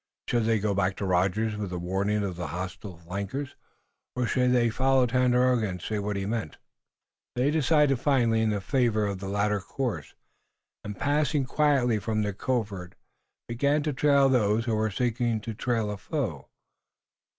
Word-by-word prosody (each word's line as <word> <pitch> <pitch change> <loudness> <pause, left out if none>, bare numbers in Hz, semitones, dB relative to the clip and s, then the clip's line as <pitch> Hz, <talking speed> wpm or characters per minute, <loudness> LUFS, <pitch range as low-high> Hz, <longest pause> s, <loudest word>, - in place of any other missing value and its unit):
Should 120 -2 +1
they 115 0 +3
go 105 0 0
back 95 -1 0
to 100 - -4
Rogers 95 +4 +1
with 105 -3 -4
a 90 - -3
warning 100 +4 -1
of 95 -3 -3
the 85 -1 -4
hostile 90 +3 -6
flankers, 100 - -5 0.6
or 125 -1 0
should 125 +1 +2
they 120 -2 +3
follow 130 +1 +3
Tandakora 125 -2 +2
and 90 -1 -5
see 105 +4 -3
what 105 0 -2
he 100 0 -2
meant? 110 -6 -3 0.8
They 130 +4 +2
decided 150 -3 +3
finally 120 -6 +2
in 110 -2 +1
favor 115 -3 +1
of 100 -2 -3
the 100 0 -5
latter 105 +1 +1
course, 105 - -4 0.7
and 105 -1 -6
passing 145 - +1
quietly 135 -5 +2
from 110 0 -1
their 105 -1 -2
covert, 100 -5 -3 0.5
began 140 +5 +1
to 150 -1 -1
trail 140 0 +4
those 115 -3 +2
who 115 - 0
were 110 0 +1
seeking 120 +1 0
to 115 +1 -5
trail 115 -2 -1
a 105 - -5
foe. 95 - -4
110 Hz, 170 wpm, -27 LUFS, 100-125 Hz, 0.8 s, trail